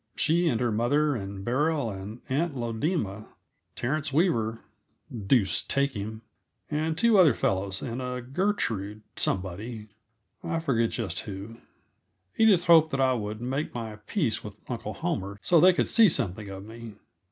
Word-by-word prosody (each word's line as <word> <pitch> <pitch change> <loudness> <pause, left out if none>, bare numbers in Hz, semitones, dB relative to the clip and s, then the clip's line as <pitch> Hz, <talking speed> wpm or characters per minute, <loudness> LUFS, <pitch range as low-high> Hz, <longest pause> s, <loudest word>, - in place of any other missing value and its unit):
She 170 +3 +2
and 120 -8 +1
her 120 -2 +1
mother, 145 +7 +2
and 100 -2 -6
Beryl 140 0 +1
and 100 +4 -8
Aunt 145 +3 0
Lodema, 115 - -2 0.5
Terence 145 +4 -2
Weaver 115 - +1 0.7
deuce 95 -8 +3
take 140 +4 0
him! 110 +1 -6 0.5
and 155 +1 -1
two 225 +1 +5
other 155 -10 +6
fellows, 95 0 -1
and 120 +1 -4
a 125 0 -3
Gertrude 120 - -2
somebody 105 +4 -3 0.5
I 165 -1 -1
forget 115 -8 +1
just 115 -5 -3
who. 105 +3 -7 0.8
Edith 210 -6 +5
hoped 165 -2 +6
that 135 - -2
I 130 -1 +4
would 105 -2 -4
make 135 +4 -3
my 110 -3 -5
peace 145 - 0
with 105 -1 -8
Uncle 115 -3 -4
Homer, 100 - -3
so 170 - +5
they 185 +4 +8
could 180 - 0
see 225 -3 +6
something 100 - -2
of 95 0 -8
me. 115 -1 -10
120 Hz, 150 wpm, -27 LUFS, 105-155 Hz, 0.8 s, they